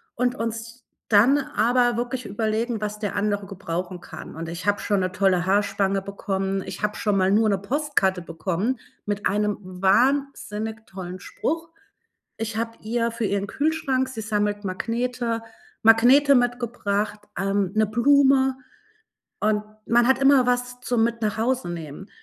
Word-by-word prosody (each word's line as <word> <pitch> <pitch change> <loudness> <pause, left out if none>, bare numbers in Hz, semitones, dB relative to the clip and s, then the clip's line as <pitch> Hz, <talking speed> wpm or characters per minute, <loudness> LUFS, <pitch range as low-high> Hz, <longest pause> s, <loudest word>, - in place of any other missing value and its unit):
und 250 +1 0
uns 230 +1 -5 0.3
dann 230 +7 +5
aber 245 -2 +1
wirklich 245 0 -3
überlegen, 220 +2 -1
was 210 0 -3
der 205 -2 -3
andere 205 -1 0
gebrauchen 180 -1 -5
kann. - - -10
Und 165 0 -5
ich 170 +3 -6
habe 205 0 +2
schon 205 -2 +1
'ne 185 0 -1
tolle 185 -2 +2
Haarspange 195 0 +1
bekommen, 195 -1 -2
ich - - -7
habe 210 0 0
schon 210 -2 0
mal 190 0 +3
nur 215 +1 +4
'ne 200 - +2
Postkarte 200 -6 0
bekommen 185 +8 -2 0.3
mit 205 0 -3
einem 210 +1 0
wahnsinnig 220 +3 0
tollen 185 -1 -7
Spruch. 330 +2 -3 0.7
Ich 220 0 -4
habe 230 0 -1
ihr 230 +1 -1
für 230 0 -4
ihren 200 0 -1
Kühlschrank 275 -3 0
sie 225 -4 -6
sammelt 205 -1 -1
Magnete 230 +4 -2 0.4
Magnete 250 +6 +6
mitgebracht, 235 -4 0 0.2
ähm, 195 -1 0
'ne 215 0 +4
Blume 265 +3 +4 0.9
und 210 0 +2 0.2
man 240 +1 +4
hat 265 - +4
immer 270 -2 +5
was 245 0 0
zum 245 -3 +1
mit 230 0 -1
nach 215 0 -1
Hause 245 -3 0
nehmen. 165 +3 -7
215 Hz, 150 wpm, -24 LUFS, 200-245 Hz, 0.9 s, Magnete